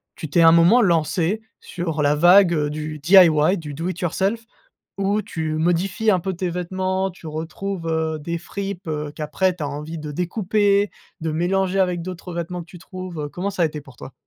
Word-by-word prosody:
tu 160 Hz, -, -7 dB
t'es, 165 Hz, +3 st, +4 dB
un 165 Hz, -, +8 dB
moment, 170 Hz, +9 st, +6 dB
lancée 175 Hz, +3 st, +1 dB, 0.2 s
sur 165 Hz, -4 st, -3 dB
la 145 Hz, 0 st, +3 dB
vague, 175 Hz, +4 st, +6 dB
heu, 150 Hz, -2 st, 0 dB
du 155 Hz, 0 st, -5 dB
DIY, 170 Hz, +1 st, +6 dB
du 150 Hz, -4 st, -7 dB
do 165 Hz, +5 st, -4 dB
it 185 Hz, -, -5 dB
yourself, 195 Hz, +6 st, -1 dB, 0.6 s
où 200 Hz, +2 st, +1 dB
tu 160 Hz, -6 st, -4 dB
modifies 175 Hz, +6 st, +1 dB
un 190 Hz, -3 st, +4 dB
peu 190 Hz, +2 st, -2 dB
tes 180 Hz, 0 st, -3 dB
vêtements, 185 Hz, +2 st, -2 dB
tu 170 Hz, -2 st, -12 dB
retrouves, 165 Hz, +4 st, -5 dB
heu, 160 Hz, -1 st, -1 dB
des 170 Hz, +3 st, -4 dB
fripes, 195 Hz, 0 st, -6 dB
heu, 150 Hz, -1 st, -3 dB
qu'après 155 Hz, +5 st, 0 dB
tu 175 Hz, -, -10 dB
as 145 Hz, -, -1 dB
envie 150 Hz, +3 st, -6 dB
de 150 Hz, -1 st, -6 dB
découper, 200 Hz, +3 st, +1 dB, 0.3 s
de 160 Hz, -1 st, -2 dB
mélanger 190 Hz, +3 st, 0 dB
avec 180 Hz, -2 st, 0 dB
d'autres 180 Hz, 0 st, -7 dB
vêtements 170 Hz, +1 st, -4 dB
que -, -, -11 dB
tu 175 Hz, +1 st, -13 dB
trouves, 185 Hz, -1 st, -8 dB
heu? 145 Hz, -1 st, -4 dB
Comment 185 Hz, +6 st, -3 dB
ça 190 Hz, -, -3 dB
a -, -, +5 dB
été 150 Hz, -1 st, -4 dB
pour 135 Hz, -3 st, -17 dB
toi? 130 Hz, -, -10 dB
175 Hz, 205 wpm, -22 LUFS, 155-190 Hz, 0.6 s, un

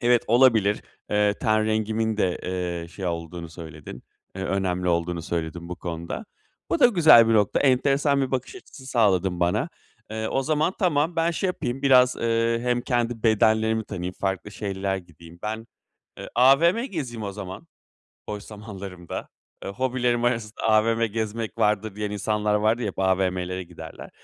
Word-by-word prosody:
Evet, 120 Hz, 0 st, +4 dB
olabilir, 115 Hz, -4 st, +4 dB, 0.3 s
eee, 105 Hz, 0 st, +2 dB
ten 110 Hz, -3 st, +2 dB
rengimin 110 Hz, 0 st, 0 dB
de, 90 Hz, -4 st, 0 dB
eee, 90 Hz, -2 st, -3 dB
şey 95 Hz, +2 st, -6 dB
olduğunu 85 Hz, 0 st, -4 dB
söyledin, 80 Hz, -6 st, -10 dB, 0.3 s
eee, 95 Hz, -, -4 dB
önemli 90 Hz, -2 st, -1 dB
olduğunu 85 Hz, 0 st, 0 dB
söyledin 85 Hz, 0 st, -4 dB
bu 90 Hz, -, -5 dB
konuda. 85 Hz, -, -5 dB, 0.5 s
Bu -, -, +2 dB
da 250 Hz, -, +9 dB
güzel 160 Hz, -, +7 dB
bir 115 Hz, -, +3 dB
nokta, 105 Hz, -2 st, +2 dB
enteresan 140 Hz, +1 st, +3 dB
bir 135 Hz, -, -1 dB
bakış 130 Hz, -, -3 dB
açısı 140 Hz, -, -13 dB
sağladın 95 Hz, -7 st, +2 dB
bana. 90 Hz, -, +1 dB, 0.4 s
Eee, 110 Hz, 0 st, -3 dB
o 135 Hz, -, 0 dB
zaman, 155 Hz, +5 st, +1 dB
tamam, 165 Hz, -1 st, +1 dB
ben 165 Hz, +1 st, +2 dB
şey 170 Hz, +3 st, -1 dB
yapayım 135 Hz, -8 st, -3 dB
biraz, 130 Hz, -2 st, +5 dB
ııı, 115 Hz, 0 st, +1 dB
hem 120 Hz, 0 st, 0 dB
kendi 120 Hz, -2 st, -1 dB
bedenlerimi 110 Hz, 0 st, +3 dB
tanıyayım, 90 Hz, -3 st, -5 dB
farklı 95 Hz, +1 st, -2 dB
şeyler 100 Hz, -1 st, -3 dB
gideyim. 85 Hz, -2 st, -13 dB
Ben, 110 Hz, +1 st, -4 dB, 0.5 s
eee, -, -, -7 dB
AVM 160 Hz, -, +5 dB
gezeyim 130 Hz, -, -5 dB
o 100 Hz, -1 st, -4 dB
zaman 95 Hz, -2 st, -8 dB, 0.6 s
boş 105 Hz, -1 st, -5 dB
zamanlarımda. 100 Hz, -5 st, -8 dB, 0.3 s
Eee, -, -, -5 dB
"Hobilerim 125 Hz, +1 st, 0 dB
arasında 115 Hz, -3 st, -2 dB
AVM 115 Hz, +1 st, +3 dB
gezmek 110 Hz, +1 st, -4 dB
vardır." 105 Hz, -1 st, +1 dB
diyen 105 Hz, 0 st, -3 dB
insanlar 105 Hz, 0 st, 0 dB
vardır 110 Hz, +3 st, +2 dB
ya, 110 Hz, -, -1 dB
hep 95 Hz, -, -6 dB
AVM'lere 95 Hz, -1 st, 0 dB
giderler. 85 Hz, -, -10 dB
110 Hz, 160 wpm, -25 LUFS, 95-120 Hz, 0.6 s, da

